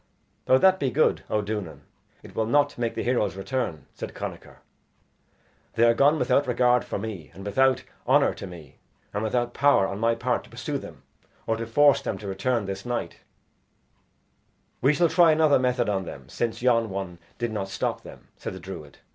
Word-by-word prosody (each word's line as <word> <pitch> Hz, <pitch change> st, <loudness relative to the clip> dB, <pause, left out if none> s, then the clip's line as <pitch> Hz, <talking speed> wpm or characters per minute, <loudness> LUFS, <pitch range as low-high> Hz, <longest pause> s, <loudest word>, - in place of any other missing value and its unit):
"Though 130 Hz, -, +6 dB
that 190 Hz, +5 st, +4 dB
be 135 Hz, -, +1 dB
good, 155 Hz, +4 st, +2 dB
O 105 Hz, -1 st, 0 dB
Duanan, 100 Hz, -9 st, -5 dB, 0.4 s
it -, -, -13 dB
will 110 Hz, -1 st, 0 dB
not 145 Hz, +3 st, +2 dB
make 120 Hz, -1 st, -2 dB
the -, -, -2 dB
heroes 120 Hz, -6 st, 0 dB
return," 95 Hz, -5 st, -3 dB
said -, -, -7 dB
Connachar; -, -, -8 dB, 1.1 s
"they 115 Hz, -, +2 dB
are 115 Hz, 0 st, +6 dB
gone 145 Hz, +6 st, +4 dB
without 130 Hz, +1 st, +2 dB
regard 125 Hz, 0 st, +3 dB
for -, -, -4 dB
me, 100 Hz, -7 st, -6 dB
and 95 Hz, +2 st, -10 dB
without 130 Hz, +6 st, +2 dB, 0.2 s
honor -, -, +4 dB
to -, -, -8 dB
me, 80 Hz, -7 st, -12 dB, 0.3 s
and 105 Hz, -, -2 dB
without 120 Hz, +2 st, -1 dB
power 140 Hz, -8 st, +4 dB
on 100 Hz, +1 st, -4 dB
my 115 Hz, +1 st, +2 dB
part 115 Hz, -, -1 dB
to -, -, -18 dB
pursue -, -, -4 dB
them, -, -, -12 dB, 0.4 s
or 115 Hz, -, 0 dB
to 115 Hz, 0 st, -5 dB
force 145 Hz, +4 st, +4 dB
them -, -, -3 dB
to 105 Hz, -, -8 dB
return 100 Hz, +4 st, -1 dB
this 95 Hz, 0 st, -5 dB
night." 120 Hz, -8 st, -4 dB, 1.6 s
"We 140 Hz, +3 st, +4 dB
shall 170 Hz, +3 st, +4 dB
try 170 Hz, -2 st, +5 dB
another 155 Hz, -3 st, +4 dB
method 125 Hz, -1 st, +1 dB
on 95 Hz, -2 st, -1 dB
them, -, -, -9 dB
since 120 Hz, 0 st, -3 dB
yon 115 Hz, -3 st, +3 dB
one 95 Hz, -3 st, -5 dB, 0.2 s
did 120 Hz, -1 st, -2 dB
not 100 Hz, -3 st, -3 dB
stop -, -, -2 dB
them," -, -, -14 dB
said -, -, -6 dB
the 95 Hz, -, -8 dB
druid. 85 Hz, -6 st, -9 dB
115 Hz, 190 wpm, -25 LUFS, 100-130 Hz, 1.6 s, Though